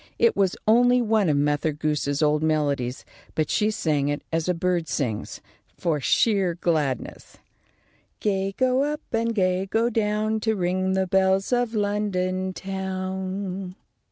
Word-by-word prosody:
It 465 - +3
was 190 -2 +1
only 245 +3 +5
one 220 -6 +2
of 145 - +2
Mother 145 +2 +1
Goose's 150 -1 -1
old 150 0 +2
melodies, 145 -5 0 0.3
but 155 -2 0
she 210 - +2
sang 150 -9 0
it 145 +1 -2
as 165 +2 0
a 180 - +2
bird 175 -1 0
sings, 115 -9 -3 0.4
for 160 -3 0
sheer 195 - +2
gladness: 155 -7 -2 0.8
"Gay 195 -1 -1
go 255 0 +2
up 295 +1 -1
and 230 0 0
gay 185 -1 +1
go 230 +4 +1
down, 215 0 0
To 220 0 0
ring 185 0 0
the 190 0 +1
bells 190 +3 +2
of 245 -2 0
London 190 -3 -1
town." 190 0 -4
190 Hz, 145 wpm, -24 LUFS, 160-210 Hz, 0.8 s, only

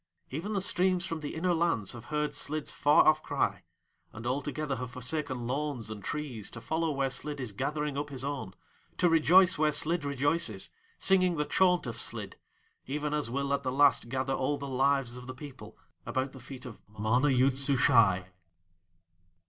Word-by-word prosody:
Even 170 +10 -3
the 195 - 0
streams 185 -1 +1
from 165 -4 -3
the 150 -2 -5
inner 175 +2 +1
lands 165 - +1
have 120 -1 -9
heard 150 0 -1
Slid's 155 0 -3
far 145 +1 +4
off 155 0 +5
cry, - - -1 0.5
and 110 +2 -9
all 130 +4 0
together 145 -1 -3
have 125 -1 -5
forsaken 130 0 -2
lawns 130 -4 -3
and 105 -2 -7
trees 135 -7 -4
to 115 - -9
follow 160 +8 -1
where 135 -2 0
Slid 145 +2 -3
is 125 -5 -3
gathering 150 +6 -2
up 145 0 -4
his 135 -1 -5
own, 140 -10 -4 0.4
to 180 - +4
rejoice 175 +2 +5
where 155 -1 +3
Slid 160 +2 0
rejoices, 145 +4 -1 0.3
singing 185 -3 +3
the 150 - 0
chaunt 180 -1 +3
of 115 -2 -4
Slid, - - -4 0.5
even 150 +2 -2
as 150 -5 -1
will 140 +3 -1
at 140 - 0
the 130 - -2
Last 140 -3 +4
gather 130 +1 -1
all 135 +2 0
the 140 0 -6
Lives 135 -2 +1
of 125 0 -10
the 130 - -6
People 140 0 -11 0.3
about 130 +1 -2
the 130 - -10
feet 130 +1 -9
of 115 -4 -9 0.2
MANA 115 +7 +2
YOOD 130 0 +3
SUSHAI. 115 -9 +4
140 Hz, 185 wpm, -30 LUFS, 125-155 Hz, 0.5 s, off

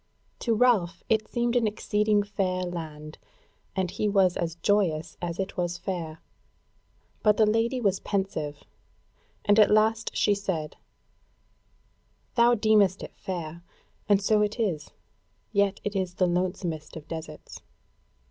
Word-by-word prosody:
To 230 -2 +1
Ralph 205 -8 +2
it 220 -1 +2
seemed 240 0 -1
an 235 -3 +3
exceeding 210 0 +1
fair 185 -3 -1
land, 155 -3 -7 0.6
and 185 -2 -1
he 210 - -1
was 190 -3 +3
as 165 -1 -2
joyous 170 -4 +1
as 170 -1 -3
it 195 0 -4
was 175 -1 -1
fair; 165 -5 -5 1.0
but 210 -1 +4
the 220 - +5
Lady 225 +4 +1
was 200 -5 +1
pensive, 160 -8 -3 0.8
and 205 +1 +5
at 210 - +7
last 220 +1 +2
she 205 - +3
said: 190 -6 -3 1.6
"Thou 240 0 +5
deemest 210 -4 +3
it - - -9
fair, 170 -2 -6 0.5
and 200 -1 +5
so 210 +1 +2
it 210 +3 -1
is; 170 -10 -1 0.6
yet 200 -2 +2
is 190 -3 -2
it - - -31
the 185 - +3
lonesomest 175 -3 -2
of 155 -2 -9
deserts. 160 -2 -8
195 Hz, 140 wpm, -27 LUFS, 170-210 Hz, 1.6 s, at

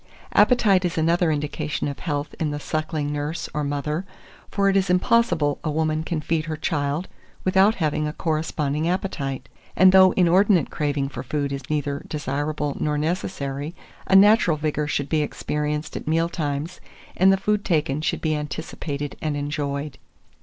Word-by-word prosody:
Appetite 210 -7 +4
is 175 -2 -2
another 165 +1 +2
indication 150 0 -2
of 140 - -5
health 145 -3 -3
in 155 - 0
the 145 0 -3
suckling 155 -1 -2
nurse 150 +3 -3
or 150 - -1
mother; 145 +4 -2 0.5
for 200 -1 +1
it 195 - +3
is 195 -1 +2
impossible 180 -6 +2
a 155 - -1
woman 155 0 0
can 160 -1 -3
feed 155 0 -1
her 155 -2 -4
child 150 +1 -1 0.4
without 190 +4 +4
having 155 -2 0
a - - -2
corresponding 155 -1 -1
appetite; 155 -8 -3 0.3
and 185 0 +7
though 190 0 +7
inordinate 180 -2 +3
craving 145 -2 -1
for 135 - -6
food 140 +2 -2
is 140 - -6
neither 145 -2 -2
desirable 145 0 -2
nor 150 -1 0
necessary, 150 -2 -3 0.3
a 190 - +3
natural 200 -4 +6
vigour 150 0 -1
should 145 -1 -1
be 155 0 +1
experienced 150 +1 -3
at - - -6
meal 165 +2 +2
times, 150 +1 -3 0.3
and 190 +2 +5
the 195 - +3
food 210 +1 0
taken 150 -4 0
should - - -1
be 155 -1 0
anticipated 150 -1 -5
and 150 -2 -1
enjoyed. 145 -1 -3
155 Hz, 165 wpm, -23 LUFS, 145-175 Hz, 0.5 s, and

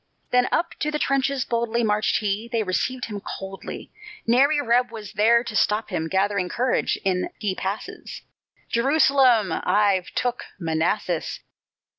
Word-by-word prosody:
Then 250 0 +4
up 340 - 0
to 300 - 0
the 300 - -1
trenches 275 -2 0
boldly 235 0 0
Marched 210 0 +2
he 210 +2 -2
they 230 -2 +1
received 250 +7 -1
him 210 -3 -6
coldly; 195 0 -7 0.3
Nary 275 +6 +4
reb 245 -2 +2
was 220 -2 -9
there 230 +3 +4
to 225 - -6
stop 210 +1 +1
him. 160 - -1
Gathering 190 0 0
courage, 250 +5 0
in 185 -1 0
he 205 -3 -1
passes: 190 +3 -6 0.4
"Jerusalem! 255 - +3
I've 200 0 +1
took 245 0 -1
Manassas." 165 +1 -1
225 Hz, 140 wpm, -24 LUFS, 195-250 Hz, 0.4 s, Then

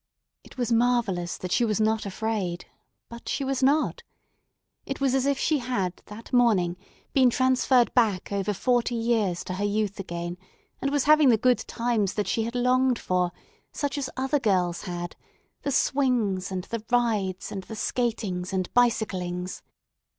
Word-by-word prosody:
It - - -16
was 245 -2 -1
marvellous 230 -7 +1
that 185 - -6
she 245 - +3
was 215 -3 +1
not 220 -1 +1
afraid, 195 -4 -3 0.4
but 235 0 -9
she 280 - -1
was 270 -1 -1
not. 285 +4 +2 0.8
It 275 - -5
was 270 -2 +1
as 265 0 +2
if 280 -1 +2
she 305 0 +1
had 235 -8 -2
that 220 +4 -11
morning 210 -8 +3 0.4
been 260 -2 +5
transferred 255 0 +3
back 215 -8 +2
over 200 +1 0
forty 240 +3 +1
years 225 -6 0
to 185 - -5
her 190 +3 -3
youth 205 -1 -1
again, 175 -1 -5 0.4
and 275 - 0
was 285 -1 +1
having 305 -2 +6
the 230 - +5
good 250 0 +3
times 230 -5 0
that 210 - 0
she 225 - 0
had 235 +2 -5
longed 250 0 +3
for, 180 -3 0 0.4
such 285 0 -2
as 280 -2 -2
other 270 +3 +1
girls 180 -7 +1
had—the 175 +9 -7
swings, 245 -10 +1
and 185 -1 -3
the 230 +2 -5
rides, 215 -6 0
and 190 -2 -5
the 220 - -8
skatings, 210 -6 -2
and 185 -2 -2
bicyclings. 185 -7 0
225 Hz, 165 wpm, -26 LUFS, 190-250 Hz, 0.8 s, having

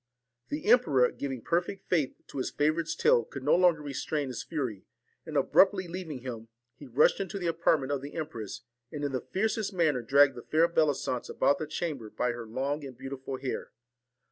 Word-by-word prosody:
The 150 - -4
emperor 155 - +5
giving 135 -4 -5
perfect 175 +3 -1
faith 155 -7 +1
to - - -5
his 130 - -1
favourite's 155 +2 0
tale 120 - +4
could 135 +4 -9
no 145 - +3
longer 175 -4 +4
restrain 145 0 -2
his 125 - -4
fury; 130 - -4 0.4
and - - -2
abruptly 190 -2 +4
leaving 170 -6 -6
him, 115 -3 -6 0.3
he 145 - -12
rushed 130 +5 +4
into 195 0 -3
the 185 - -4
apartment 160 -4 +1
of 140 -2 -1
the 140 +1 -8
empress, 115 -10 -5 0.3
and 145 -1 -5
in 145 - -1
the 130 -2 -2
fiercest 215 +1 0
manner 155 -7 +2
dragged 135 +4 +5
the 120 - -8
fair 160 +6 +3
Bellisance 150 -6 0
about 145 - +2
the 155 - -3
chamber 150 -8 -4
by 125 +3 -1
her 120 -1 -7
long 140 +6 -2
and 130 -3 -9
beautiful 135 0 -6
hair. 130 0 -5
145 Hz, 190 wpm, -29 LUFS, 130-165 Hz, 0.4 s, emperor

